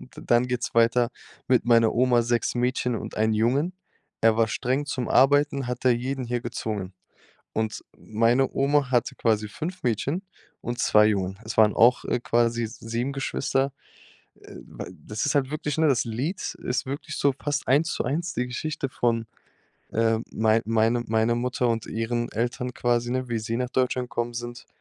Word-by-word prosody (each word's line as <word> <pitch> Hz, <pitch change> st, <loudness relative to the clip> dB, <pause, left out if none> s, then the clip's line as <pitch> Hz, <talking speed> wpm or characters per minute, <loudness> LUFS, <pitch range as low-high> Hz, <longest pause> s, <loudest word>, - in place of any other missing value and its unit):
dann 120 Hz, +1 st, +2 dB
geht's 125 Hz, -1 st, -2 dB
weiter: 115 Hz, +1 st, +4 dB, 0.4 s
„Mit 125 Hz, -2 st, +3 dB
meiner 115 Hz, -2 st, +4 dB
Oma, 125 Hz, -1 st, +3 dB
6 120 Hz, 0 st, 0 dB
Mädchen 125 Hz, 0 st, 0 dB
und -, -, -6 dB
1 110 Hz, 0 st, +2 dB
Jungen. 135 Hz, +11 st, +1 dB, 0.5 s
Er 110 Hz, -1 st, +5 dB
war 115 Hz, -1 st, +3 dB
streng 130 Hz, +5 st, -1 dB
zum 130 Hz, -4 st, -3 dB
Arbeiten, 140 Hz, 0 st, +3 dB
hat 125 Hz, +1 st, -5 dB
er 125 Hz, -, +6 dB
jeden 130 Hz, +2 st, -2 dB
hier 120 Hz, 0 st, -2 dB
gezwungen.“ 105 Hz, -5 st, -4 dB, 0.6 s
Und 110 Hz, -1 st, -2 dB
meine 115 Hz, +4 st, +1 dB
Oma 140 Hz, -1 st, +2 dB
hatte 120 Hz, -2 st, +1 dB
quasi 110 Hz, -2 st, +1 dB
5 170 Hz, -, -6 dB
Mädchen 140 Hz, -, -1 dB, 0.4 s
und 120 Hz, 0 st, -4 dB
2 105 Hz, -2 st, +5 dB
Jungen. 95 Hz, -2 st, -1 dB
Es 110 Hz, -, -6 dB
waren 110 Hz, -1 st, +5 dB
auch, 120 Hz, +2 st, +5 dB
äh, 120 Hz, -, -1 dB
quasi 120 Hz, -1 st, +1 dB
7 115 Hz, +3 st, -4 dB
Geschwister. 135 Hz, 0 st, -1 dB, 0.6 s
Äh, -, -, -14 dB
d -, -, -9 dB, 0.2 s
das 105 Hz, -, -2 dB
ist 145 Hz, -, 0 dB
halt 140 Hz, 0 st, +1 dB
wirklich, 150 Hz, -1 st, -3 dB
ne? 160 Hz, -1 st, +4 dB
Das 130 Hz, -5 st, +2 dB
Lied 135 Hz, -, -3 dB
ist 125 Hz, +2 st, -1 dB
wirklich 145 Hz, +3 st, -5 dB
so 140 Hz, -1 st, +2 dB
fast 145 Hz, 0 st, -1 dB
Eins-zu-eins 160 Hz, +3 st, +1 dB
die 125 Hz, 0 st, -1 dB
Geschichte 135 Hz, +2 st, -3 dB
von, 115 Hz, -2 st, 0 dB, 0.7 s
ähm, 115 Hz, 0 st, +1 dB
mein 110 Hz, +1 st, +2 dB
meine 115 Hz, +1 st, +2 dB
meiner 110 Hz, +1 st, +2 dB
Mutter 125 Hz, 0 st, 0 dB
und 115 Hz, -1 st, -1 dB
ihren 120 Hz, +2 st, -2 dB
Eltern 120 Hz, +2 st, -2 dB
quasi, 120 Hz, 0 st, 0 dB
ne? 130 Hz, 0 st, -2 dB
Wie 120 Hz, -1 st, -1 dB
sie 110 Hz, +1 st, -3 dB
nach 125 Hz, 0 st, -2 dB
Deutschland 125 Hz, -1 st, 0 dB
gekommen 120 Hz, 0 st, -2 dB
sind. 120 Hz, +1 st, -6 dB
120 Hz, 170 wpm, -25 LUFS, 115-130 Hz, 0.7 s, er